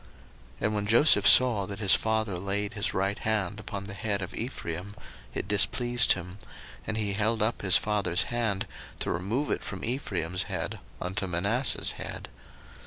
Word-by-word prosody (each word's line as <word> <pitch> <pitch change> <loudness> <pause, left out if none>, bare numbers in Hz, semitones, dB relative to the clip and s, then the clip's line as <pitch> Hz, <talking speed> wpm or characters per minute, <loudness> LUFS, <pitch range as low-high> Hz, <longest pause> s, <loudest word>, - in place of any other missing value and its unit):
01:048:017 - - -4
And 105 - 0
when 105 -1 -2
Joseph 115 -2 +6
saw 120 -6 +7
that 100 - -7
his 100 -3 +5
father 110 -4 0
laid 100 +2 -2
his 100 0 -1
right 100 +2 -1
hand 105 -2 -2
upon 100 -2 -6
the 100 0 -8
head 100 -1 -2
of 90 - -8
Ephraim, 100 -5 -6 0.4
it - - -3
displeased 120 +4 +3
him: 90 +2 -8 0.5
and 110 - -2
he 105 -2 -1
held 110 +2 0
up 110 +1 -1
his 95 -2 +7
father's 100 -4 +1
hand, 110 -5 -1 0.3
to - - -2
remove 110 - -2
it - - -2
from - - -6
Ephraim's 95 - -2
head - - -4 0.2
unto 95 +2 -3
Manasseh's 100 +9 +1
head. - - -6
105 Hz, 170 wpm, -27 LUFS, 95-110 Hz, 0.5 s, saw